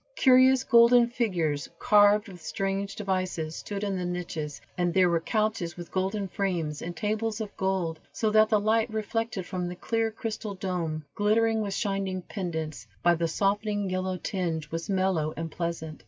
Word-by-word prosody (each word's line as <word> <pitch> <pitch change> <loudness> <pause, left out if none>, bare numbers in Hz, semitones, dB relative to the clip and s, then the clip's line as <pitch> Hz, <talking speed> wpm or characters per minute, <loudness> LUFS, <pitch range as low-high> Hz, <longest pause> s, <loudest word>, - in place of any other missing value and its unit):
Curious 260 0 +6
golden 235 0 +6
figures, 175 - -1
carved 210 0 +5
with 180 -3 -11
strange 195 +4 -2
devices, 185 -5 -2
stood 200 0 -5
in 200 -2 -1
the - - -2
niches, 170 -4 -4 0.2
and 175 -1 +1
there 180 -1 +4
were 170 - +2
couches 215 -2 -1
with 175 -1 -8
golden 195 +2 -1
frames, 175 -6 -2
and 175 +1 -5
tables 215 +1 -1
of 215 -2 -5
gold, 185 -4 -1
so 220 -1 0
that 215 0 +5
the 215 - +4
light, 220 +2 +1
reflected 220 -2 -2
from 180 -1 -3
the 175 - -5
clear 225 +4 0
crystal 215 -2 -5
dome, 170 -5 -3
glittering 220 +2 +2
with 200 -2 -2
shining 195 -3 -2
pendants, 160 - -5 0.2
by 175 - +5
the 170 0 0
softening 205 +2 0
yellow 185 0 -1
tinge, 165 -5 -3
was 165 +3 -4
mellow 185 -5 +1
and 165 0 -4
pleasant. 165 -2 -4
190 Hz, 170 wpm, -27 LUFS, 170-215 Hz, 0.2 s, Curious